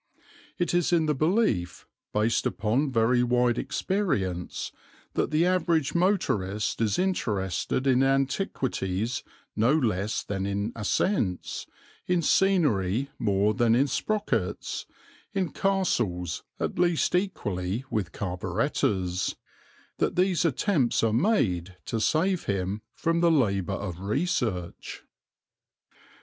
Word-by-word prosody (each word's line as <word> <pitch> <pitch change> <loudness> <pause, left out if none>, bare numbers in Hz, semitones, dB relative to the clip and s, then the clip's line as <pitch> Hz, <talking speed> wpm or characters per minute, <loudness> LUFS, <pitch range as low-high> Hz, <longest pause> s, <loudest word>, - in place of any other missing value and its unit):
It 175 -2 0
is 175 -1 +2
in 165 -2 +3
the 150 - +2
belief, 150 - 0 0.3
based 110 +2 +1
upon 120 +7 0
very 120 +1 +3
wide 125 0 +2
experience, 105 - -2 0.4
that - - 0
the 155 +3 +2
average 170 -5 +1
motorist 110 - 0
is 110 -3 +1
interested 115 - -1
in 130 -1 +4
antiquities 130 - 0 0.3
no 115 +6 +3
less 110 - 0
than 95 -1 -3
in 100 +3 -2
ascents, 105 - -1 0.4
in 180 -2 +2
scenery 140 - +2
more 100 0 +2
than 115 -1 +3
in 135 +3 +4
sprockets, 145 - -2 0.5
in 190 -6 -1
castles 120 - 0 0.2
at - - -2
least 175 -2 +2
equally 110 - -1
with 105 -7 -1
carburettors, 95 0 -1 0.6
that - - +1
these 180 -2 +2
attempts 155 - +1
are 110 -1 +2
made 95 - +1
to 115 - -2
save 180 - +1
him 100 +1 -2
from 165 0 0
the 170 0 +4
labour 100 - +2
of 90 -4 -4
research. 100 - -2
120 Hz, 110 wpm, -27 LUFS, -, 0.6 s, in